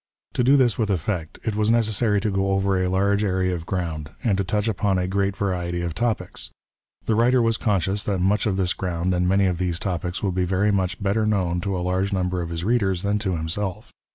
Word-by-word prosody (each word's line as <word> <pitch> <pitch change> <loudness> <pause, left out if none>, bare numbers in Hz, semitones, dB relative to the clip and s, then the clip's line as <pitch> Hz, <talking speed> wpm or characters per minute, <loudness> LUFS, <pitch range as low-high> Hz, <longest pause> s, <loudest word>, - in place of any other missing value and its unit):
To 125 - +1
do 135 +3 +5
this 125 -4 +2
with 110 -2 +1
effect, 90 -3 -2
it 110 -3 -2
was 105 0 +1
necessary 110 -2 +2
to 105 0 0
go 95 0 +1
over 95 -1 +1
a 90 - 0
large 100 +2 +2
area 95 -2 +1
of 85 -1 -5
ground, 80 -5 -3
and 110 -6 +2
to - - +2
touch 105 +3 -1
upon 100 -2 +1
a 90 0 0
great 100 +1 0
variety 90 -3 -2
of 85 -1 -3
topics. 115 +4 -1 0.6
The 115 - +1
writer 120 +3 +4
was 115 -1 +2
conscious 100 -2 0
that 100 -2 0
much 100 +5 +2
of 95 -2 0
this 90 -2 +1
ground 90 0 -2
and 90 0 +1
many 100 +1 +3
of 90 -2 0
these 90 -2 0
topics 90 -1 -3
would 95 -3 0
be 90 0 0
very 95 +3 +1
much 95 +1 -1
better 105 +2 +1
known 90 -4 0
to 95 0 -2
a 90 - -2
large 95 +2 0
number 90 -1 0
of 85 - -4
Ins 85 0 -4
readers 100 -5 +1
than 100 +1 +1
to 95 -3 -1
himself. 95 +6 -3
95 Hz, 235 wpm, -23 LUFS, 90-105 Hz, 0.6 s, do